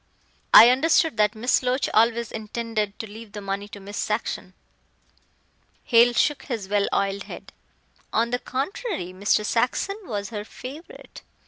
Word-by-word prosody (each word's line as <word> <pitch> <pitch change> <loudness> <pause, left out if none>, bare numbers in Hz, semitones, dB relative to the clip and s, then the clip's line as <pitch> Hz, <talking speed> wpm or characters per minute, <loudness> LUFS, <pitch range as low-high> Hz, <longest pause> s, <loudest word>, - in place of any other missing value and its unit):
I 235 - +10
understood 320 +1 +2
that 210 0 +2
Miss 240 +4 +1
Loach 255 +1 0
always 230 +1 +2
intended 215 -1 -3
to - - -5
leave 220 0 -12
the 210 - -6
money 200 0 -4
to 205 - -10
Miss 200 +1 -9
Saxon." 210 -3 -3 1.3
Hale 240 0 +5
shook 295 +4 +1
his 225 -8 -4
well 205 0 +1
oiled 200 0 -1
head. - - -10 0.6
"On 230 +2 +1
the 245 - 0
contrary, 275 - -4
Mr. 200 +2 +1
Saxon 250 - 0
was 205 - -4
her 210 -2 -4
favorite. 270 +9 -11
225 Hz, 145 wpm, -24 LUFS, 205-250 Hz, 1.3 s, I